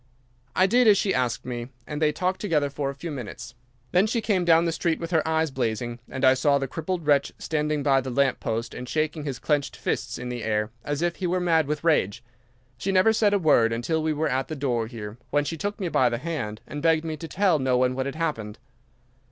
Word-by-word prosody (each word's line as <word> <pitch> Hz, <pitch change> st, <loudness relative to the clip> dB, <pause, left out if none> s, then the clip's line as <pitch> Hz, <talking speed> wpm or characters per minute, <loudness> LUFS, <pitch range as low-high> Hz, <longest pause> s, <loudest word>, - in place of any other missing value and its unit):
"'I 185 Hz, -, +5 dB
did 240 Hz, +4 st, +4 dB
as 205 Hz, -2 st, +7 dB
she 195 Hz, 0 st, +1 dB
asked 125 Hz, -2 st, -1 dB
me, 120 Hz, -1 st, -4 dB, 0.2 s
and 150 Hz, 0 st, -5 dB
they 150 Hz, -1 st, +4 dB
talked 185 Hz, +5 st, -2 dB
together 150 Hz, -8 st, +1 dB
for 140 Hz, -1 st, -2 dB
a 140 Hz, -, -6 dB
few 160 Hz, +4 st, -6 dB
minutes. 125 Hz, -8 st, -7 dB, 0.4 s
Then 185 Hz, +4 st, +4 dB
she 230 Hz, +2 st, 0 dB
came 205 Hz, -5 st, +1 dB
down 165 Hz, 0 st, +5 dB
the 165 Hz, -, +1 dB
street 165 Hz, 0 st, -1 dB
with 165 Hz, 0 st, -5 dB
her 160 Hz, -2 st, +3 dB
eyes 160 Hz, -1 st, +1 dB
blazing, 120 Hz, -1 st, -2 dB
and 130 Hz, -, -1 dB
I 130 Hz, -, +7 dB
saw 140 Hz, +2 st, +3 dB
the 135 Hz, -1 st, -2 dB
crippled 165 Hz, +4 st, -4 dB
wretch 145 Hz, -2 st, +3 dB
standing 150 Hz, -2 st, -1 dB
by 135 Hz, -2 st, +3 dB
the 130 Hz, -, -5 dB
lamp 135 Hz, +1 st, +1 dB
post 115 Hz, 0 st, -3 dB
and 125 Hz, -, -7 dB
shaking 155 Hz, -1 st, -1 dB
his 135 Hz, -4 st, -3 dB
clenched 145 Hz, -2 st, -1 dB
fists -, -, -3 dB
in 125 Hz, 0 st, -5 dB
the 120 Hz, -1 st, -4 dB
air 105 Hz, 0 st, 0 dB
as 145 Hz, +2 st, -2 dB
if 175 Hz, 0 st, 0 dB
he 185 Hz, -, -2 dB
were 180 Hz, +1 st, +1 dB
mad 165 Hz, -4 st, +2 dB
with 150 Hz, 0 st, -2 dB
rage. 130 Hz, -, +1 dB, 0.6 s
She 195 Hz, -, -1 dB
never 190 Hz, +4 st, +4 dB
said 210 Hz, -2 st, +3 dB
a -, -, +4 dB
word 145 Hz, -10 st, +4 dB
until 120 Hz, +8 st, -1 dB
we 155 Hz, 0 st, 0 dB
were 155 Hz, +1 st, 0 dB
at 130 Hz, -1 st, -1 dB
the 155 Hz, -, -5 dB
door 125 Hz, -5 st, -1 dB
here, 110 Hz, -1 st, -8 dB
when 145 Hz, 0 st, +1 dB
she 165 Hz, -, -3 dB
took 205 Hz, +7 st, -4 dB
me 190 Hz, -, -1 dB
by 130 Hz, -6 st, +3 dB
the 120 Hz, -, -2 dB
hand 125 Hz, -8 st, -4 dB
and 145 Hz, -, -6 dB
begged 160 Hz, 0 st, +3 dB
me 160 Hz, -1 st, -3 dB
to 165 Hz, -, -7 dB
tell 185 Hz, -3 st, +2 dB
no 130 Hz, -1 st, +2 dB
one 125 Hz, 0 st, +2 dB
what 130 Hz, +1 st, -2 dB
had 140 Hz, -, -5 dB
happened. 130 Hz, -11 st, -3 dB
150 Hz, 245 wpm, -25 LUFS, 125-165 Hz, 0.6 s, as